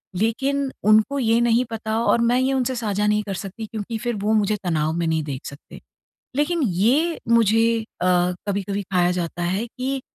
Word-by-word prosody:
लेकिन 270 +7 0
उनको 215 +7 +4
ये 230 -2 +2
नहीं 235 +1 +3
पता 220 0 -2
और 235 - +3
मैं 240 +2 +3
ये 260 +1 +1
उनसे 260 -1 0
साझा 210 -3 -1
नहीं 210 0 +2
कर 200 -1 -5
सकती 200 +4 -6
क्योंकि 220 +1 -5
फिर 240 +1 -2
वो 215 +1 +2
मुझे 210 -1 +2
तनाव 160 -3 0
में 170 0 -1
नहीं 160 -1 0
देख 140 -3 -6
सकते। 140 +1 -11 0.5
लेकिन 315 +4 +1
ये 250 - +1
मुझे 230 0 +3 0.2
अ, - - +1 0.4
कभी-कभी 200 0 -2
खाया 180 -1 +3
जाता 175 -1 -3
है 190 +6 -1
कि 260 +3 -4
220 Hz, 185 wpm, -22 LUFS, 195-240 Hz, 0.5 s, उनको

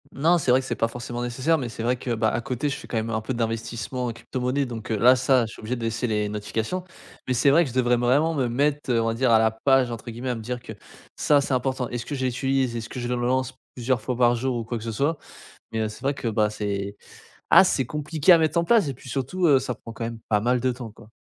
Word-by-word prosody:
N 135 - -8
non, 170 +3 +5
c'est 135 -6 +1
vrai 130 - +5
que - - -9
c'est - - -2
pas 115 - +1
forcément 120 +1 -6
nécessaire 130 +7 +1
mais 130 -5 -3
c'est 115 0 -6
vrai 125 +2 +2
que 120 -1 -3
ben, 110 0 +2
à 110 - -2
côté 135 +4 -2
je 140 - -2
fais - - -10
quand 115 - -3
même 110 +1 -2
un 110 -1 -1
peu 120 +4 -3
d'investissement 115 +2 -3
en 115 - -3
crypto 120 +3 -6
monnaie 130 +3 0
donc 115 -3 -6
heu, 110 - +1
là 125 +5 +6
ça, 130 -1 +3
je 110 - -9
suis - - -12
obligé 110 +4 -3
de 120 - -6
laisser 115 +2 -1
les 105 -2 0
notifications 110 - -3 0.4
mais 130 - +1
c'est 125 +3 +3
vrai 165 +5 +5
que - - -5
je 125 - -10
devrais 125 -1 +3
vraiment 135 +7 +2
me 135 -5 0
mettre, 140 +3 0
heu, 115 -1 +3
on - - -1
va 115 - +1
dire, 125 +2 +1
«à 110 - +6
la 110 0 +3
page» 130 +2 +2
entre 115 +1 -7
guillemets, 120 +3 -5
à 125 - 0
me 115 - -6
dire 125 +2 -5
que 110 - -9 0.4
ça 145 -2 +3
c'est 135 - -2
important. 130 -1 -1
Est-ce 120 -1 -4
que 145 - -4
je 130 -1 -2
l'utilise? 130 0 0
Est-ce 115 -1 -5
que - - -6
je 120 - -3
le 125 - -1
lance 130 +2 0 0.2
plusieurs 125 -1 0
fois 125 +3 -2
par 120 -1 +4
jour 125 +1 -1
ou 115 - -3
quoi 120 +2 -4
que 110 - -8
ce 115 - -3
soit? 145 +8 0 0.6
Mais 110 - -1
heu, 110 - 0
c'est 105 +4 -11
vrai 140 +1 0
que 120 - -3
bah, 105 -1 +1
c'est 100 -1 -3 0.5
ah - - +8
c'est 145 -8 +1
compliqué 150 +5 +1
à 175 - +9
mettre 160 0 +1
en 170 - +3
place 215 -1 +3
et 140 - -2
puis 130 +1 -13
surtout, 140 +8 -1
heu, 140 -3 +6
ça 125 - -4
prend 115 - -11
quand 115 - -6
même 115 -1 -6
pas 105 -2 +3
mal 125 +3 +1
de 130 +1 +1
temps, 120 -2 -7
quoi. 105 - -17
125 Hz, 300 wpm, -24 LUFS, 115-135 Hz, 0.6 s, à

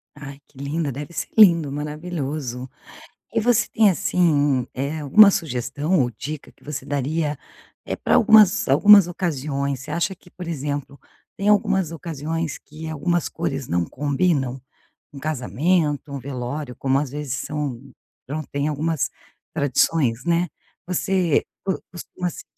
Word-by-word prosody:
Ai 140 -1 -9
que 140 - -25
linda, 145 +1 -2
deve 145 +4 -7
ser - - -3
lindo, 170 -9 +6
maravilhoso. 150 -4 -4 0.6
E - - +2
você 230 -1 +3
tem, 220 -2 +4
assim, 145 -7 +2
eh, 140 +4 -3
alguma 200 +8 +7
sugestão 145 +4 -1
ou 120 -2 +1
dica 150 +6 -7
que - - -28
você 145 -2 -6
daria, 145 +2 -1 0.5
eh, - - -2
pra - - +1
algumas 215 -3 +6
algumas 200 +7 +7
ocasiões. 140 -6 -2
Você 150 - -8
acha 170 +4 -1
que, 180 - -20
por 180 -1 -9
exemplo, 145 -3 -4 0.4
tem 200 +1 0
algumas 200 -5 +2
ocasiões 165 -1 -4
que 160 +2 -10
algumas 160 +2 -1
cores 135 -1 -3
não 85 0 +1
combinam? 140 - 0 0.5
Um 140 - -9
casamento, 150 +1 0
um 140 - -3
velório, 130 +1 -5
como 135 0 +1
às 140 -2 -2
vezes 145 -2 -5
são 140 -3 -3 0.5
pronto, 150 +2 -4
tem 145 +1 -1
algumas 150 -1 -1 0.5
tradições, 140 -3 +1
né, 170 +1 +1 0.4
você 180 -2 +1 0.2
co 190 - -1
costuma 180 0 -5
se - - -10
150 Hz, 145 wpm, -22 LUFS, 140-170 Hz, 0.6 s, alguma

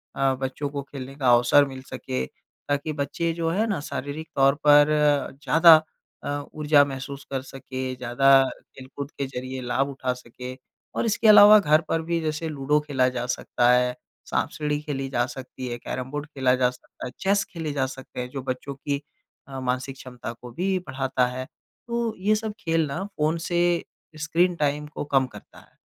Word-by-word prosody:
अ, 135 -1 +2
बच्चों 135 +2 -3
को 140 0 -4
खेलने 135 -1 -7
का 135 -3 +1
अवसर 125 +4 +5
मिल 135 -1 -8
सके 65 - -4
ताकि 145 - -5
बच्चे 145 +3 -1
जो 165 0 -1
है 205 +6 +1
ना 205 -7 -1
शारीरिक 145 +2 -5
तौर 135 0 +4
पर 145 0 +8 0.6
ज़्यादा 165 +4 +8 0.5
अ, 145 0 -3
ऊर्जा 150 -1 +4
महसूस 140 0 -6
कर 135 -1 -1
सके, 130 -1 -6
ज़्यादा 135 +2 +4 0.3
खेलकूद 135 +2 -8
के 140 - -4
ज़रिए 130 0 -6
लाभ 125 +3 0
उठा 130 -2 -2
सकें। 125 +1 -9 0.4
और - - 0
इसके 225 0 +1
अलावा 210 0 +10
घर 155 -3 +4
पर 165 - +1
भी 170 +1 -1
जैसे 155 +1 -2
लूडो 150 0 +1
खेला 140 -4 +1
जा 125 -1 -3
सकता 125 0 +1
है, 125 0 +3 0.3
साँप-सीढ़ी 150 -1 -1
खेली 135 -3 -3
जा 120 -2 +1
सकती 130 0 -8
है, 120 -1 -4
कैरम-बोर्ड 130 +5 -5
खेला 130 -4 +1
जा 125 -1 +3
सकता 125 - -11
है, 125 - -5
चेस 200 +1 +2
खेले 160 -3 -3
जा 135 -2 +1
सकते 130 -1 -8
हैं 125 - -5
जो 135 - -4
बच्चों 130 +2 -4
की 140 +1 -3 0.5
अ, 135 -1 -6
मानसिक 130 +1 -2
क्षमता 125 -3 -8
को 125 -1 -9
भी 185 +8 0
बढ़ाता 130 -1 0
है। 130 +1 -5 0.4
तो 235 -1 -1
ये 210 +3 +3
सब 215 0 -3
खेल 165 -5 +1
ना 140 +7 -3
फ़ोन 160 -5 -1
से 175 0 +1 0.6
स्क्रीन 170 +3 +1
टाइम 150 -1 -1
को 150 - -6
कम 135 -2 +2
करता - - -14
है। - - -22
140 Hz, 185 wpm, -25 LUFS, 130-155 Hz, 0.6 s, अलावा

